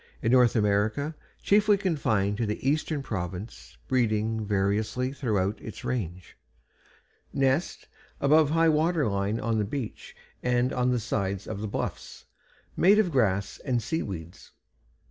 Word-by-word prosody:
In 115 Hz, -, +2 dB
North 125 Hz, -2 st, +5 dB
America 110 Hz, +8 st, +1 dB, 0.3 s
chiefly 210 Hz, 0 st, +4 dB
confined 110 Hz, -, 0 dB
to 115 Hz, -1 st, -1 dB
the 105 Hz, +5 st, -3 dB
eastern 150 Hz, 0 st, 0 dB
province, 95 Hz, -2 st, -6 dB
breeding 110 Hz, -3 st, +1 dB
variously 105 Hz, +5 st, 0 dB
throughout 105 Hz, -7 st, -1 dB
its 110 Hz, -, -9 dB
range. 90 Hz, -7 st, -4 dB, 1.0 s
NEST 135 Hz, +4 st, 0 dB, 0.3 s
Above 150 Hz, +1 st, +4 dB
high 165 Hz, +1 st, +3 dB
water 160 Hz, -1 st, +2 dB
line 100 Hz, +2 st, -1 dB
on 115 Hz, -1 st, 0 dB
the -, -, +1 dB
beach 115 Hz, +2 st, -6 dB, 0.3 s
and 125 Hz, +1 st, +1 dB
on 125 Hz, 0 st, +1 dB
the 125 Hz, -1 st, +1 dB
sides 100 Hz, -3 st, -2 dB
of 105 Hz, -2 st, -5 dB
the 110 Hz, -, -3 dB
bluffs; 100 Hz, -, -5 dB, 0.5 s
made 200 Hz, +4 st, +5 dB
of 205 Hz, -5 st, +2 dB
grass 100 Hz, -7 st, +1 dB
and 125 Hz, -4 st, 0 dB
sea 160 Hz, +9 st, -1 dB
weeds. 85 Hz, -1 st, -8 dB
115 Hz, 140 wpm, -27 LUFS, 100-140 Hz, 1.0 s, North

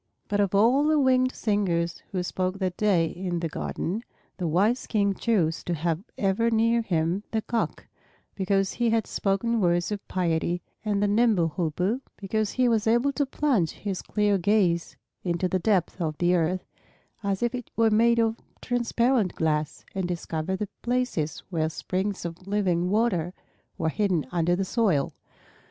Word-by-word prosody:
But 205 Hz, -1 st, 0 dB
of 200 Hz, -1 st, +2 dB
all 240 Hz, +8 st, +5 dB
the 310 Hz, 0 st, +3 dB
winged 255 Hz, -1 st, +3 dB
singers 180 Hz, -8 st, 0 dB
who 185 Hz, -2 st, -1 dB
spoke 185 Hz, +1 st, -2 dB
that 185 Hz, -2 st, -2 dB
day 195 Hz, -6 st, +3 dB
in 175 Hz, +1 st, -3 dB
the 165 Hz, -, -1 dB
garden, 180 Hz, +5 st, -3 dB, 0.4 s
the 180 Hz, -, -2 dB
wise 200 Hz, +10 st, +2 dB
King 200 Hz, -2 st, +2 dB
chose 185 Hz, -7 st, 0 dB
to 175 Hz, -, -1 dB
have 165 Hz, +2 st, -1 dB
ever 205 Hz, +4 st, +2 dB
near 230 Hz, +1 st, +3 dB
him 170 Hz, -2 st, 0 dB
the 220 Hz, -1 st, -1 dB
Cock, 235 Hz, -1 st, -2 dB, 0.5 s
because 195 Hz, 0 st, +1 dB
he 240 Hz, -1 st, 0 dB
had 225 Hz, -1 st, +2 dB
spoken 220 Hz, +4 st, 0 dB
words 175 Hz, +1 st, +2 dB
of 205 Hz, -1 st, -5 dB
piety, 175 Hz, -1 st, 0 dB, 0.2 s
and 205 Hz, -2 st, 0 dB
the -, -, +3 dB
nimble 205 Hz, -5 st, +3 dB
Hoopoe, 180 Hz, -, -1 dB, 0.2 s
because 210 Hz, +1 st, -1 dB
he 255 Hz, -1 st, +2 dB
was 225 Hz, -2 st, +2 dB
able 240 Hz, +5 st, +3 dB
to 285 Hz, 0 st, -1 dB
plunge 260 Hz, -, +1 dB
his 195 Hz, -3 st, -4 dB
clear 205 Hz, -2 st, +1 dB
gaze 180 Hz, -3 st, +1 dB, 0.3 s
into 175 Hz, 0 st, 0 dB
the 185 Hz, +1 st, 0 dB
depths 190 Hz, -3 st, +1 dB
of 155 Hz, -2 st, -2 dB
the 175 Hz, 0 st, +2 dB
earth 180 Hz, +1 st, +1 dB, 0.6 s
as 200 Hz, +1 st, -1 dB
if 240 Hz, -, +1 dB
it 250 Hz, -2 st, -5 dB
were 225 Hz, -1 st, +3 dB
made 235 Hz, +2 st, +4 dB
of 225 Hz, -1 st, +2 dB, 0.2 s
transparent 240 Hz, -3 st, +1 dB
glass 155 Hz, -2 st, -1 dB
and 190 Hz, -2 st, -2 dB
discover 170 Hz, 0 st, -3 dB
the 205 Hz, 0 st, -4 dB
places 240 Hz, -11 st, -1 dB
where 160 Hz, -2 st, 0 dB
springs 190 Hz, +4 st, -3 dB
of 170 Hz, +2 st, -7 dB
living 180 Hz, -4 st, +1 dB
water 190 Hz, -5 st, +1 dB, 0.4 s
were 160 Hz, -, 0 dB
hidden 185 Hz, -4 st, 0 dB
under 175 Hz, 0 st, +2 dB
the 195 Hz, +1 st, -1 dB
soil. 190 Hz, -, +1 dB
195 Hz, 170 wpm, -26 LUFS, 175-225 Hz, 0.6 s, all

